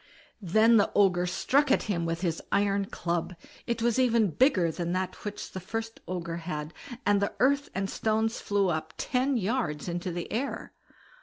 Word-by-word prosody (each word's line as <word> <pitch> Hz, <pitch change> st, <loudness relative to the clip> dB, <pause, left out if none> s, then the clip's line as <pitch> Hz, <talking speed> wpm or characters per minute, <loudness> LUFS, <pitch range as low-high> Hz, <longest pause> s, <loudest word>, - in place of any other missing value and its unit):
Then 220 Hz, +5 st, +5 dB
the 205 Hz, -, +3 dB
Ogre 180 Hz, -3 st, +4 dB
struck 270 Hz, +10 st, +2 dB
at -, -, +3 dB
him 170 Hz, -6 st, -1 dB
with 165 Hz, +1 st, -2 dB
his 170 Hz, -3 st, -1 dB
iron 200 Hz, 0 st, +2 dB
club; 175 Hz, -1 st, -3 dB, 0.3 s
it 235 Hz, -1 st, -1 dB
was 235 Hz, +1 st, +2 dB
even 230 Hz, -6 st, +3 dB
bigger 185 Hz, -, +3 dB
than 170 Hz, +1 st, -3 dB
that 185 Hz, 0 st, -3 dB
which 210 Hz, -1 st, -6 dB
the 185 Hz, -, -5 dB
first 225 Hz, +5 st, -5 dB
Ogre 170 Hz, -2 st, -3 dB
had, 155 Hz, -2 st, -5 dB, 0.3 s
and 205 Hz, -1 st, +3 dB
the 200 Hz, -, 0 dB
earth 280 Hz, +2 st, +3 dB
and 195 Hz, +1 st, -1 dB
stones 220 Hz, +2 st, 0 dB
flew 200 Hz, -2 st, +1 dB
up 160 Hz, -1 st, -3 dB
ten 260 Hz, +1 st, +1 dB
yards 195 Hz, -, -1 dB
into 175 Hz, +1 st, -3 dB
the 175 Hz, 0 st, -5 dB
air. 260 Hz, +6 st, -3 dB
195 Hz, 175 wpm, -28 LUFS, 175-225 Hz, 0.3 s, Then